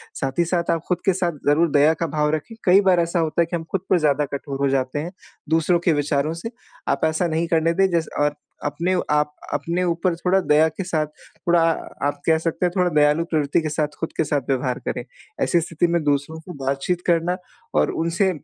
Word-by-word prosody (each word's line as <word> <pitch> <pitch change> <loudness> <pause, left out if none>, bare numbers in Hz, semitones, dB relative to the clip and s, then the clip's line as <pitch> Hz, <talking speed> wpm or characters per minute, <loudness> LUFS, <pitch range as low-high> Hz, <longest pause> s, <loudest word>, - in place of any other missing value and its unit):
साथ 135 +3 -3
ही 170 - +4
साथ 170 0 -1
आप 165 - 0
खुद 180 - +1
के 190 - +4
साथ 175 -1 0 0.2
ज़रूर 160 +3 +4
दया 145 +2 +5
का 165 - 0
भाव 150 0 0
रखें। 155 +9 -7
कई 190 +2 +6
बार 190 -3 +4
ऐसा 170 +1 0
होता 160 +1 +1
है - - +3
कि 170 - -4
हम 165 - -3
खुद 195 - 0
पे 185 - +5
ज़्यादा 150 -1 +2
कठोर 140 0 -4
हो 140 - +2
जाते 135 +1 0
हैं 165 +4 -4 0.4
दूसरों 165 +2 +3
के 170 - +4
विचारों 145 +1 0
से 225 +7 -6 0.4
आप - - -1
ऐसा 160 +2 +1
नहीं 165 +1 -1
करने 165 0 +2
दें 195 +2 +3
जैसे 165 -2 -1
और 145 0 +1 0.3
अपने 165 +6 0 0.2
आप 150 0 +1 0.2
अपने 175 +2 -1
ऊपर 175 0 0
थोड़ा 180 +2 +2
दया 155 -3 +4
के 160 +5 -6
साथ 155 -4 0 0.3
थोड़ा 175 -1 +2 0.5
आप 145 0 -3
कह 160 -1 +5
सकते 165 +2 -1
हैं 175 - +1
थोड़ा 180 -1 +3
दयालु 150 +1 +3
प्रवृत्ति 150 0 +1
के 155 - -2
साथ 150 0 -2
खुद 165 - -4
के - - +3
साथ 145 -2 0
व्यवहार 130 -2 0
करें। - - -2 0.4
ऐसी 170 - +2
स्थिति 165 +1 0
में - - -1
दूसरों 145 +2 -1
को 175 +3 -10
बातचीत 140 +6 -1
करना 175 +1 +2 0.4
और - - +1
उनसे 170 +4 +1
165 Hz, 225 wpm, -22 LUFS, 150-175 Hz, 0.5 s, कई